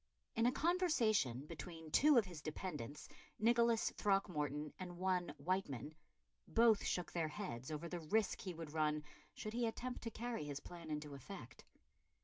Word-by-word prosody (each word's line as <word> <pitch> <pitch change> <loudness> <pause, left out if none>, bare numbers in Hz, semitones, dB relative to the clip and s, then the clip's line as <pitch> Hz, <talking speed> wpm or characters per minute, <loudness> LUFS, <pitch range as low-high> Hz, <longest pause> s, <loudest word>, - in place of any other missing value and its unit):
In 230 0 +3
a - - +5
conversation 240 - +2
between 160 0 -8
two 295 - +7
of 225 - +6
his 175 -4 -8
dependants, 150 -3 -5 0.3
Nicholas 235 +1 +4
Throckmorton 150 -7 0
and 180 -2 -6
one 180 -1 0
Wightman, 150 - -1 0.5
both 225 -2 +5
shook 180 - -1
their 165 -2 0
heads 150 - -5
over 155 +2 -3
the 175 +1 -3
risk 205 +7 +1
he 185 -5 -4
would 160 -2 -7
run 150 -1 +1 0.3
should 215 - -5
he 235 0 +1
attempt 245 +2 -4
to 230 - -3
carry 230 -5 -3
his 145 -1 -3
plan 170 +1 -9
into 150 -1 -3
effect. 140 -1 -9
175 Hz, 155 wpm, -39 LUFS, 150-220 Hz, 0.5 s, two